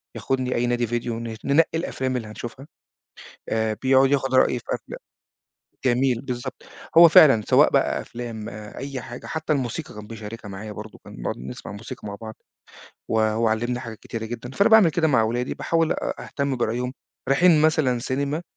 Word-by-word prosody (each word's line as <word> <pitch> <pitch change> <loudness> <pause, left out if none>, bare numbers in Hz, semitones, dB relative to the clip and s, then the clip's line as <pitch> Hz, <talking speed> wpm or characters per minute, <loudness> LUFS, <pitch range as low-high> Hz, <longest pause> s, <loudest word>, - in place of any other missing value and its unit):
ياخدني 130 -1 -1
أي 120 - +1
نادي 120 -1 0
فيديو 120 0 -2
ن 115 -1 -5
ننقي 145 +4 +4
الأفلام 130 -6 -2
اللي 115 -3 -5
هنشوفها. 120 +5 -8 0.8
آآ، 110 -1 0
بيقعد 135 +1 +4
ياخد 135 -2 +1
رأيي 125 -1 +4
في - - -15
الأفلام - - -4 0.9
جميل، 125 -1 +2
بالضبط. 125 0 -5 0.3
هو 170 0 +10
فعلًا، 135 -8 +7
سواء - - +6
بقى - - +1
أفلام، 115 -3 -7
آآ، 105 0 -9
أي 135 -1 -5
حاجة، 120 0 -9
حتى 160 -1 -2
الموسيقى 125 -8 -3
كان 105 0 -9
بيشاركها 110 -1 -8
معايا 105 +2 -7
برضو، 105 +1 -9
كنا - - -14
بنقعد - - -4
نسمّع 65 +10 -8
موسيقى 105 0 -8
مع 100 - -5
بعض، 110 -1 -7 0.7
و - - -2
وهو 110 +1 +2
علمني 120 +3 -1
حاجات 110 -3 -8
كتيرة 115 -1 -6
جدًا. 120 +2 -6
فأنا 200 +10 +2
باعمل 220 -6 +7
كده 160 0 +1
مع 120 -6 +4
ولادي، 120 +3 -1
باحاول 165 -1 +1
أ - - -3
أهتم 140 -2 -2
برأيهم. 120 +1 -1 0.4
رايحين 155 +3 +5
مثلًا 150 -6 +3
سينما، 140 +6 -2
120 Hz, 180 wpm, -24 LUFS, 110-135 Hz, 0.9 s, هو